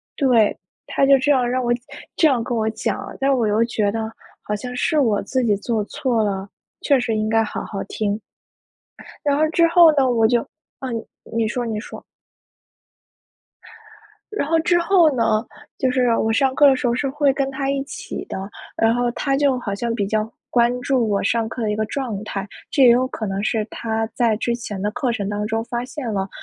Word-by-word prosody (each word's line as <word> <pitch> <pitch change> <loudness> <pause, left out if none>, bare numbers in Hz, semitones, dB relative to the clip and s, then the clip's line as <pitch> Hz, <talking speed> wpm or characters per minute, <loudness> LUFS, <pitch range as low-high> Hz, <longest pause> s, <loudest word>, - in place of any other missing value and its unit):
对。 245 -7 +3 0.3
他 275 - +2
就 275 0 +6
这 290 +3 +3
样 250 -3 +1
让 255 0 0
我 240 -1 +1 0.4
这 320 - +4
样 255 -4 +1
跟 235 +1 -2
我 220 0 +1
讲 220 0 -2
了， - - -9
但 270 0 +1
我 240 -3 +1
又 210 +1 +2
觉 215 -3 0
得 220 0 -3 0.3
好 210 - -2
像 245 +4 -6
是 300 +4 +1
我 220 -7 +2
自 260 -1 -1
己 215 - +3
做 220 +1 -1
错 230 +1 -1
了， 195 -1 -2 0.3
确 280 - +3
实 245 -3 -1
应 215 0 0
该 225 0 +3
好 - - -4
好 200 - -5
听。 205 -1 -1 1.1
然 285 - +2
后 310 +2 +2
之 335 +1 +3
后 340 -1 +7
呢， 270 -2 +4
我 225 -2 +3
就 240 0 +2 0.4
啊 265 - -4 0.5
你 225 -1 +1
说 245 +2 -2
你 220 -2 -3
说。 - - -10 2.3
然 420 - -1
后 330 +1 +3
之 350 +2 +3
后 340 -4 +4
呢， 225 -1 +2 0.3
就 260 - +1
是 250 -2 +2
我 225 - +1
上 260 +3 +2
课 290 - +6
的 270 -1 +6
时 255 - -2
候 235 - +2
是 275 +3 -1
会 280 0 +2
跟 270 0 -1
他 275 0 -2
一 275 0 -1
起 280 - -7
的， - - -6 0.4
然 225 0 +3
后 245 0 +1
他 275 +1 0
就 275 -2 +2
好 200 -4 -3
像 230 +3 -2
比 205 -3 -1
较 215 +1 -1 0.2
关 240 0 +2
注 250 -4 +1
我 200 -1 0
上 225 +2 0
课 235 +1 -5
的 215 - 0
一 210 - -1
个 215 - 0
状 225 -4 -4
态， 195 -2 -4 0.2
这 280 - +2
也 250 - +8
有 250 +2 +4
可 225 -4 -5
能 195 0 -2
是 220 -3 0
他 225 -1 -2
在 230 -1 +1
之 235 +2 -1
前 210 -5 -6
的 205 - -1
课 250 +1 -1
程 200 -3 -3
当 205 0 -2
中 225 +1 -1
发 240 0 -3
现 255 -3 -5
了 195 -1 -2
235 Hz, 230 characters per minute, -21 LUFS, 220-270 Hz, 2.3 s, 也